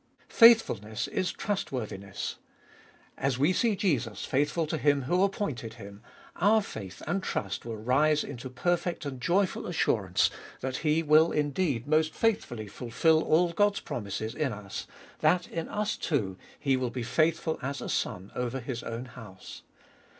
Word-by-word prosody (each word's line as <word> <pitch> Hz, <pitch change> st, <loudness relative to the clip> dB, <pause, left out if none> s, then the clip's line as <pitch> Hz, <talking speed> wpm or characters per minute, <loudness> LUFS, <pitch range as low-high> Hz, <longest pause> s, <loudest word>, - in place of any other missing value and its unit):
Faithful 230 Hz, -, +6 dB
ness 110 Hz, +1 st, -4 dB
is 185 Hz, -2 st, -1 dB
trustworthiness. 110 Hz, -, -4 dB, 0.8 s
As 135 Hz, -2 st, 0 dB
we 145 Hz, +7 st, +3 dB
see 225 Hz, +2 st, +2 dB
Jesus 140 Hz, -, -1 dB
faithful 150 Hz, +4 st, +1 dB
to 155 Hz, +1 st, -3 dB
Him 145 Hz, -2 st, +3 dB
who 175 Hz, +8 st, +1 dB
appointed 155 Hz, -, -1 dB
Him, 100 Hz, -2 st, -11 dB, 0.4 s
our 210 Hz, +4 st, +4 dB
faith 100 Hz, -, -8 dB
and 175 Hz, +6 st, -1 dB
trust 100 Hz, -, -3 dB
will 115 Hz, -2 st, -5 dB
rise 145 Hz, +7 st, +2 dB
into 130 Hz, -2 st, -7 dB
perfect 175 Hz, +4 st, -1 dB
and 130 Hz, -3 st, -5 dB
joyful 185 Hz, +6 st, +1 dB
assurance -, -, +1 dB, 0.3 s
that 130 Hz, 0 st, -2 dB
He 155 Hz, +1 st, +1 dB
will 155 Hz, +2 st, +5 dB
indeed 145 Hz, -4 st, 0 dB
most 155 Hz, +1 st, +2 dB
faithfully 140 Hz, -, 0 dB
fulfil 130 Hz, +9 st, +2 dB
all 170 Hz, +3 st, +3 dB
God's 205 Hz, +2 st, +2 dB
promises 110 Hz, 0 st, -4 dB
in 150 Hz, -4 st, -1 dB
us, 105 Hz, -2 st, -6 dB, 0.3 s
that 180 Hz, -1 st, +3 dB
in 165 Hz, -1 st, -4 dB
us 210 Hz, 0 st, -1 dB
too 105 Hz, -, -1 dB, 0.2 s
He 135 Hz, -2 st, +2 dB
will 130 Hz, -1 st, -1 dB
be 125 Hz, 0 st, -4 dB
faithful 160 Hz, +5 st, +1 dB
as 140 Hz, +2 st, -3 dB
a -, -, -5 dB
Son 95 Hz, +2 st, -2 dB
over 125 Hz, +1 st, -2 dB
His 120 Hz, -1 st, -5 dB
own 115 Hz, +2 st, -5 dB
house. 110 Hz, -6 st, -11 dB
140 Hz, 155 wpm, -29 LUFS, 115-170 Hz, 0.8 s, Faithful